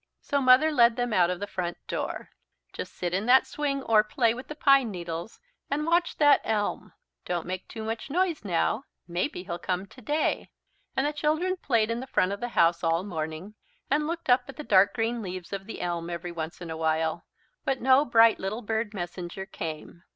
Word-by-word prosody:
So 280 -1 -1
Mother 260 +4 +6
led 235 -5 +5
them 245 -2 -1
out 175 -3 +4
of 180 -1 -2
the 205 - -3
front 180 -3 -4
door. - - -4 0.4
"Just - - -7
sit 175 -1 -3
in 195 +5 -1
that 260 +1 +6
swing 280 -2 -2
or 215 -3 +4
play 225 +1 +1
with 255 +2 -8
the 300 - -7
pine 275 -5 +4
needles 170 +1 -6 0.3
and 295 +2 -1
watch 340 +1 +1
that 290 -2 +5
elm. 210 -2 -2 0.3
Don't 175 -2 -2
make 185 +1 -5
too 220 - -7
much 225 +4 -4
noise 345 -1 0
now! 205 +7 0 0.2
Maybe 180 - -2
he'll 175 -2 -5
come 185 +2 -2
today." 270 +8 -2 0.5
And 265 - +2
the 295 - 0
children 310 +5 0
played 230 -10 +1
in 230 - -2
the 260 - -7
front 185 -6 +1
of 200 - -4
the 245 - -3
house 170 +1 +4
all 165 +1 +2
the 205 - -8
morning 160 +3 -5 0.4
and 300 +1 +2
looked 335 +1 -4
up 250 0 +4
at 275 - -8
the 300 - -5
dark 200 -4 +4
green 230 +1 -1
leaves 185 -2 -6
of 195 0 -5
the 225 - -6
elm 170 -1 -2
every 175 0 -5
once 165 0 -6
in 170 -2 -6
a 160 - -4
while. 160 0 0 0.4
But 270 -1 0
no 260 +3 +5
bright 230 -4 +5
little 210 +5 -4
bird 220 0 -2
messenger 175 +1 -5
came. 165 -3 -7
215 Hz, 210 wpm, -27 LUFS, 175-265 Hz, 0.5 s, Mother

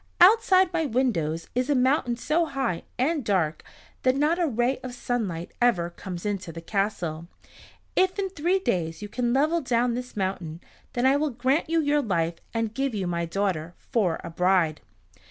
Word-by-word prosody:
Outside 375 -2 +6
my 325 -2 +1
windows 170 - 0
is 250 +3 0
a 290 - +3
mountain 255 -2 +2
so 320 +6 +1
high 265 - -2
and 290 +3 +1
dark 175 -8 0 0.4
that 255 0 +3
not 300 +5 +2
a 345 - +2
ray 245 +1 0
of 250 -1 -7
sunlight 200 -10 -3
ever 175 -9 +2
comes 180 0 -7
into 195 -4 -2
the 165 - -8
castle. 170 -3 -2 0.7
If 375 +1 +2
in 385 -2 -1
three 355 +2 +1
days 170 - -2
you - - -4
can 240 +3 -1
level 305 +6 +2
down 245 -2 +1
this 250 -2 -6
mountain, 180 -4 -3 0.3
then 245 +1 0
I 270 +2 +5
will 305 +1 0
grant 265 +6 0
you 330 0 +2
your 295 0 +2
life, 170 -7 -1
and 225 -1 -2
give 270 -1 -1
you 195 -2 -1
my 170 -1 -1
daughter 175 -2 -2
for 200 -10 0
a - - -6
bride." 180 -3 +2
240 Hz, 180 wpm, -26 LUFS, 175-285 Hz, 0.7 s, Outside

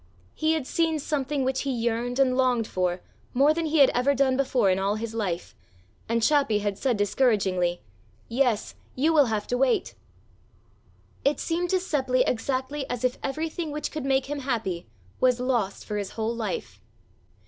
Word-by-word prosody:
He 315 +1 +1
had 315 -5 -1
seen 325 +2 +1
something 285 -1 -1
which 260 0 0
he 280 - -3
yearned 240 +1 -1
and 260 -2 +3
longed 250 -3 +2
for 180 -2 -1 0.3
more 280 +4 +5
than 330 0 -1
he 315 +1 +1
had 275 -3 +7
ever 265 +3 +2
done 265 -1 +3
before 255 -7 +2
in 185 - +1
all 200 +2 0
his 225 +1 -5
life, 190 -6 -3 0.6
and 230 0 +1
Chappi 280 -6 +3
had 205 -1 -2
said 255 -5 +1
discouragingly: 195 -5 +1 0.4
"Yes, 240 -3 0 0.2
you 310 +5 +2
will 295 -3 +6
have 215 -2 -1
to 245 - -2
wait!" 260 -2 +1 1.3
It 285 +2 +2
seemed 345 +1 -1
to 375 - +2
Seppli 265 -8 +1
exactly 260 +3 -2
as 245 -1 -3
if 255 0 0
everything 315 +3 -3
which 300 +1 -4
could 305 -3 -4
make 270 0 +2
him 290 +1 -4
happy 225 - -2 0.3
was 255 -1 +3
lost 240 -6 -1
for 210 - -3
his 200 -2 -4
whole 225 +1 -1
life. 235 - -4
255 Hz, 175 wpm, -26 LUFS, 225-280 Hz, 1.3 s, had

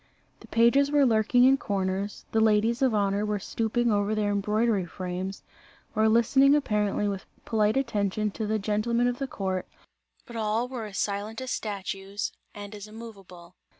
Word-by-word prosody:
The - - -15
pages 235 +5 +4
were 290 -1 +4
lurking 225 +1 +3
in 265 +1 +6
corners, 195 -2 -3
the 225 - +2
ladies 220 +2 +3
of 255 -4 +3
honour 200 0 +1
were 210 0 -1
stooping 230 +3 -1
over 205 +1 +1
their 210 -1 0
embroidery 210 -1 +1
frames, 185 +2 -5 0.5
or 220 0 +4
listening 270 +5 +5
apparently 210 -7 0
with 195 -2 -4 0.2
polite 215 +1 +2
attention 210 -4 0
to 215 +1 -4
the 220 +1 +1
gentlemen 215 +4 0
of 245 0 -2
the 275 - -2
court, 190 -5 -3 0.6
but 235 - -11
all 220 +2 0
were 250 -3 -5
as 205 -2 -7
silent 205 +2 -2
as 260 -1 -5
statues 195 -1 -4 0.2
and 205 0 -8
as 210 0 -8
immoveable. 195 -6 -12
215 Hz, 165 wpm, -27 LUFS, 200-235 Hz, 0.6 s, in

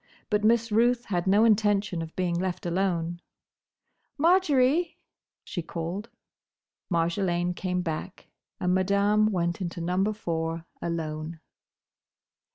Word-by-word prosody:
But 210 0 +2
Miss 230 +1 +3
Ruth 240 +3 +3
had 180 -2 -1
no 205 +4 +5
intention 205 -4 +2
of 165 0 -7
being 180 -2 0
left 180 +1 -2
alone. 175 -1 -1 1.0
"Marjory!" 320 -2 +3 0.5
she 175 - -4
called. 170 +7 -5 0.8
Marjolaine 175 +1 0
came 180 0 -2
back; 170 +3 -5 0.3
and 180 0 +1
Madame 200 +3 +3
went 170 -1 -1
into 175 -1 -4
Number 180 +5 +1
Four 165 -4 -3 0.2
alone. 160 -1 -4
185 Hz, 110 wpm, -27 LUFS, 170-210 Hz, 1.0 s, no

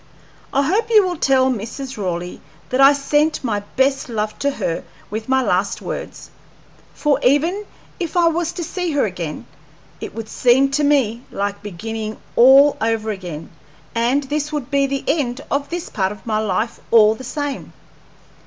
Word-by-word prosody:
I 275 +1 +2
hope 415 +10 +1
you 430 -4 +6
will 360 -1 -2
tell 265 -2 +3
Mrs. 250 +4 -5
Raleigh 180 -3 -4 0.3
that 255 +2 +1
I 275 +1 +9
sent 295 +2 +1
my 215 -5 0 0.2
best 265 0 +1
love 215 -2 -2
to 280 - +1
her 170 -11 -3 0.3
with 220 +3 -5
my 265 0 +3
last 195 -2 0
words; - - -7 0.6
for 295 -2 +1
even 330 +10 +2 0.3
if 345 0 -3
I 340 -1 +5
was 335 0 0
to 350 - -4
see 355 0 -3
her 285 - +2
again, 175 -6 -5 0.5
it - - -7
would 225 -1 -5
seem 255 +4 +3
to 295 +2 +1
me 260 -6 +2
like 200 0 -3
beginning 215 +2 -5 0.2
all 270 +4 +7
over 220 -1 0
again, 175 -6 -7 0.4
and 240 +5 +1
this 295 +2 -2
would 290 -3 -4
be 280 -1 +2
the 275 0 -3
end 275 -4 0
of 280 0 -1
this 345 0 -4
part 190 -2 -1
of 210 - -11
my 215 -2 0
life 215 +2 -1
all 220 -2 +6
the 225 - -10
same. 290 +2 -4
260 Hz, 170 wpm, -20 LUFS, 215-290 Hz, 0.6 s, I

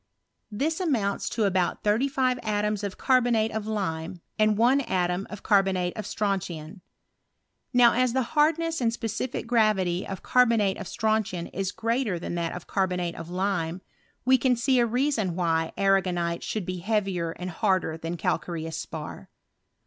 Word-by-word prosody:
This 300 - -1
amounts 235 - 0
to 225 - -1
about 190 -3 0
thirty 215 +6 +2
five 255 -2 +1
atoms 210 -1 -1
of 200 -2 -4
carbonate 240 -4 +2
<}f 215 -1 -4
lime, 180 -5 -3 0.2
and 215 -1 +3
one 250 +5 +4
atom 180 -4 -1
of 210 - -9
carbonate 190 -4 +2
of 215 -3 -5
strontian. 185 -4 -3 0.9
Now 245 -2 +6
as 250 0 +2
the 260 0 +2
hardness 325 +1 +2
and 230 -2 +2
specific 230 +2 -3
gravity 210 -7 +2
of 190 -2 -6
car 250 0 +4
bonate 210 -4 +1
of 195 - -6
strontian 215 -5 -1
is 190 0 -2
greater 230 -4 -1
than 170 - -5
that 170 -1 -2
of 180 - -8
carbonate 180 -3 -1
of 165 0 -8
lime, 180 -2 -1 0.4
we 260 0 +5
can 255 0 +3
see 250 +2 +2
a 240 - +3
reason 235 - 0
why 165 -2 0
arragonite 180 -3 +1
should 215 -4 -3
be 185 +1 -3
heavier 195 -4 0
and 180 0 -6
harder 185 -2 +1
than 165 +2 -5
calcareous 165 -1 -2
spar. 155 -2 -7
200 Hz, 160 wpm, -26 LUFS, 180-235 Hz, 0.9 s, Now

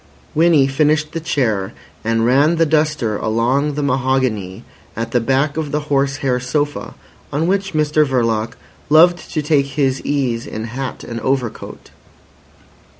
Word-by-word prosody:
Winnie 160 -3 +4
finished 150 +2 +1
the 165 - -3
chair, 110 -10 -1 0.3
and 115 0 +1
ran 140 +7 +4
the 165 0 +3
duster 150 -8 0
along 125 +6 0
the 150 - -2
mahogany 130 -8 -1 0.3
at 115 +1 -4
the 120 - +2
back 135 +5 0
of 155 -3 -3
the 150 - -1
horse 140 0 +2
hair 125 -1 +1
sofa 145 +3 -2 0.4
on 150 +3 0
which 195 +1 0
Mr 150 0 +3
Verloc 115 -4 0 0.4
loved 170 +3 +4
to 155 - -1
take 145 -2 +2
his 135 -2 +1
ease 130 -5 -1
in 110 - -5
hat 125 +3 -5
and 115 -1 -6
overcoat. 130 -1 -3
135 Hz, 150 wpm, -18 LUFS, 120-150 Hz, 0.4 s, Winnie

